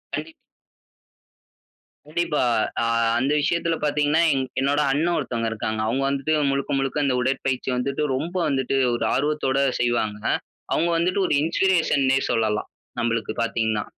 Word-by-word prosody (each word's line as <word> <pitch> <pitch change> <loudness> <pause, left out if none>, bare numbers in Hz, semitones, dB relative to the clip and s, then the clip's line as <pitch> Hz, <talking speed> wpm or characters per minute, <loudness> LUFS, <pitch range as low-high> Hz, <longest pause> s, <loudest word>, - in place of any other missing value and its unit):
கண்டிப் 155 +2 -6 1.7
கண்டிப்பா, 155 -2 0 0.4
அ - - +1 0.3
அந்த 130 +4 +1
விஷயத்தில 170 +3 0
பாத்தீங்கன்னா, 150 +1 +2
எங் 135 -1 0
என்னோட 140 +2 +1
அண்ணன் 165 +5 +1
ஒருத்தவங்க 115 -2 -2
இருக்காங்க. 110 0 -3
அவுங்க 130 +5 0
வந்துட்டு 140 +2 -1 0.2
முழுக்க, 140 0 -1
முழுக்க 135 +2 -1
இந்த 130 -2 +1
உடற்பயிற்சி 130 0 -1
வந்துட்டு 140 +4 -1
ரொம்ப 165 +7 -4
வந்துட்டு 135 -2 0 0.2
ஒரு 120 - -2
ஆர்வத்தோட 145 -2 0 0.2
செய்வாங்க. 115 -4 0 0.5
அவுங்க 170 - +1
வந்துட்டு 180 +3 +1
ஒரு - - 0
இன்ஸ்பிரேஷன்னே 160 -5 +2
சொல்லலாம். 110 -2 0 0.3
நம்பளுக்கு 115 -2 -1
பாத்தீங்கன்னா. 110 -2 0
135 Hz, 130 wpm, -23 LUFS, 120-150 Hz, 1.7 s, பாத்தீங்கன்னா